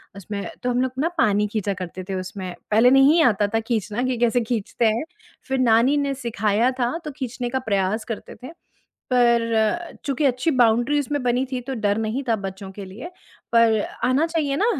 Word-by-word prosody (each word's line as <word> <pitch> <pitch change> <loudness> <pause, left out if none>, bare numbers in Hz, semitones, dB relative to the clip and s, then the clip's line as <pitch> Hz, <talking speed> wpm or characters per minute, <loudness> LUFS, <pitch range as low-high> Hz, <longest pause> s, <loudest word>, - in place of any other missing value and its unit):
उसमें 200 +1 -6 0.2
तो 250 - 0
हम 245 +1 +1
लोग 260 - 0
ना 330 +4 +1
पानी 210 -7 +2
खींचा 205 -1 -2
करते 185 0 -7
थे 190 - -2
उसमें, 185 -1 -6 0.2
पहले 225 +4 +6
नहीं 275 +5 +6
आता 210 -6 +3
था - - +3
खींचना 220 0 -1
कि 255 -2 -1
कैसे 240 +1 +2
खींचते 230 0 -2
हैं, 225 +5 +2 0.4
फिर 265 -1 -1
नानी 245 +4 +4
ने 275 - -1
सिखाया 230 -1 0
था, 245 +6 0
तो 300 - -4
खींचने 245 -2 -4
का 260 +1 -1
प्रयास 200 +2 0
करते 225 -2 -7
थे 260 - -7 0.6
पर 235 +5 +2
चूँकि 280 +1 0
अच्छी 260 +4 +1
बाउंड्री 245 +2 +3
उसमें 290 0 -2
बनी 250 +1 +1
थी, 255 - -1
तो 265 +2 -5
डर 205 -2 0
नहीं 225 +5 -2
था 230 - +3
बच्चों 195 0 -7
के 200 0 -8
लिए, 215 - -9 0.4
पर 230 -2 +4 0.3
आना 260 +5 +3
चाहिए 305 -4 -1
ना 410 - +1
235 Hz, 195 wpm, -23 LUFS, 215-260 Hz, 0.6 s, पहले